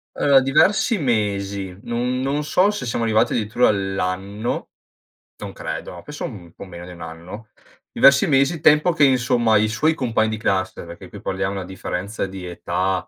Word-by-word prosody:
Allora 140 -2 +4
diversi 195 - +3
mesi, 100 - -2
non 125 +2 -2
non 140 +3 -1
so 185 +7 +2
se 205 - -5
siamo 115 0 -1
arrivati 110 -1 +2
addirittura 110 +2 +2
all'anno, 95 +2 -2 0.7
non - - -8
credo, 85 -1 -6
penso 150 0 -6
un 90 -8 -9
po' - - -10
meno 90 -1 -10
di 90 - -10
1 85 - -13
anno. 90 +7 -9 0.4
Diversi 140 0 +5
mesi, 140 +3 +2
tempo 150 +3 +5
che, 145 - +2
insomma, 120 -4 +3
i 110 +1 +2
suoi 155 +9 +1
compagni 115 -5 0
di 110 - -3
classe 95 -4 -1
perché 85 0 -11
qui - - -11
parliamo 100 +1 -2
una 95 -2 -5
differenza 95 +2 -4
di 95 -1 -8
età, 90 +1 -2
110 Hz, 170 wpm, -21 LUFS, 95-135 Hz, 0.7 s, Diversi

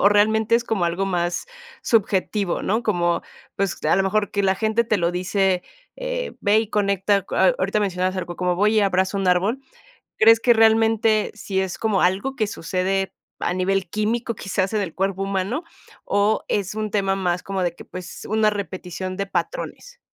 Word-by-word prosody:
O 200 - +6
realmente, 220 +2 +3
¿es 235 - -2
como 220 -6 0
algo 175 +3 -1
más 175 - -1 0.4
subjetivo?, 200 -3 +1
¿no?, 220 +4 0
como, 175 -6 +1 0.4
pues, 195 -2 -1
a 155 - +4
lo 195 - +3
mejor 205 +1 0
que 200 - 0
la 190 -1 +3
gente 220 +3 +1
te 220 -1 +1
lo 175 -2 0
dice, 185 0 +1 0.3
eh, - - -3
"Ve 205 +1 +3
y 220 -1 -5
conecta 200 -1 +1
co". - - -6
A - - +4
ahorita - - 0
mencionabas 185 -2 -1
algo 175 -2 -4
como: 180 -1 0
"Voy 210 +3 +3
y - - +5
abrazo 190 0 +1
un 190 -1 0
árbol". 195 +8 +2 0.6
¿Crees 225 +1 +7
que 240 +1 +5
realmente, 225 -1 +3
sí 200 -3 -3
es 190 -1 -2
como 215 -4 +1
algo 195 +9 +1
que 220 - +1
sucede 190 +1 -2 0.3
a - - 0
nivel 185 0 0
químico, 225 +4 -1
quizás 195 0 -2
en 215 - +1
el 175 -5 -4
cuerpo 195 0 -1
humano? 195 - -2 0.4
¿O 205 +2 +1
es 205 0 -1
un 215 -1 -3
tema 195 -2 +1
más, 180 -2 -1
como 195 -1 -3
de 175 -1 0
que - - -12
pues, 185 0 -9
una 215 0 +3
repetición 185 -2 -5
de 200 - -1
patrones? - - -4
200 Hz, 190 wpm, -22 LUFS, 185-220 Hz, 0.6 s, Crees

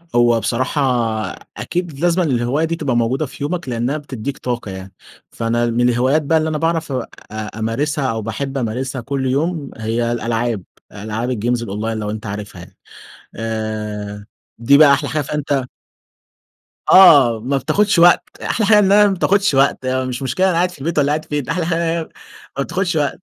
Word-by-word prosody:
هو 120 -1 +4
بصراحة 130 +6 -1 0.8
أكيد 170 -5 -4
لازمًا 175 +1 +2
الهواية 130 +2 0
دي 165 +1 -2
تبقى 140 -7 -2
موجودة 125 +6 0
في 140 +1 -8
يومك 170 -1 -3
لأنها 120 +5 -1
بتديك 135 -2 -6
طاقة 120 -5 -4
يعني. 95 0 -9 0.4
فأنا 115 +1 -1
من 120 +1 +2
الهوايات 130 +6 +2
بقى 160 +3 +2
اللي 160 0 0
أنا 155 - -1
باعرف 165 -1 -1
أ 130 -3 -2 0.5
أمارسها 140 +6 -1
أو 110 0 -3
باحب 135 +6 -4
أمارسها 130 +2 -3
كل 135 +3 -3
يوم 145 +3 -1
هي 115 +1 -1
الألعاب، 115 -3 -1 0.3
ألعاب 110 +4 -4
الجيمز 120 0 -1
الأونلاين 110 +1 -3
لو 105 -1 -3
أنت 110 +2 -5
عارفها 100 -3 -6
يعني؟ 85 - -15 0.6
آآ، 105 -2 -4 0.3
دي 130 +5 +4
بقى 145 -2 +7
أحلى 140 - 0
حاجة 150 0 -1
فأنت 140 -1 -2 1.3
آه، 140 -11 +7
ما 130 +5 -1
بتاخدش 170 +7 +1
وقت. 175 +1 +6 0.2
أحلى 220 - 0
حاجة 215 -1 +6
انها 205 +1 +5
ما 200 - +1
بتاخدش 195 -1 +2
وقت 135 -1 +2
مش 130 0 -2
مشكلة 135 +9 0
أنا 190 - +2
قاعد 175 +1 +1
في 180 - -14
البيت 160 +4 -3
والّا 145 0 +2
قاعد 155 +1 -1
فين 145 -2 -3
أحلى 165 0 -1
حاجة 165 0 0
انها 170 0 0
هي 160 - -9 0.5
ما 140 - +1
بتاخدش 180 +2 -2
وقت. 145 -3 -1
135 Hz, 180 wpm, -18 LUFS, 115-155 Hz, 1.3 s, بقى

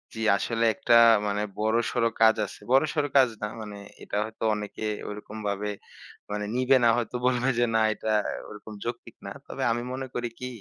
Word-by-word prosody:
জী। - - -6 0.2
আসলে 115 +2 -1
একটা - - +1 0.3
মানে 105 0 -1 0.2
বড়সর 115 +2 0 0.2
কাজ 110 0 +7
আছে। - - -11
বড়সর 150 +3 +3
কাজ 130 -2 +6
না 105 - -1
মানে 105 -1 -8 0.3
এটা - - -4
হয়তো 110 +1 -9
অনেকে 105 +1 -6 0.3
ওরকমভাবে 105 -1 -4 0.6
মানে 105 0 -2
নিবে 130 +1 +4
না। 120 - +6
হয়তো 120 0 -3
বলবে 125 +1 +2
যে, 120 - +4
"না 110 - +4
এটা 110 +1 -3 0.4
ওরকম 105 +1 -10
যৌক্তিক 120 0 -6
না।" - - -6 0.2
তবে - - -4
আমি 120 +1 -1
মনে 130 0 -4
করি 120 0 -2
কি? 125 - -4
115 Hz, 175 wpm, -26 LUFS, 105-125 Hz, 0.6 s, কাজ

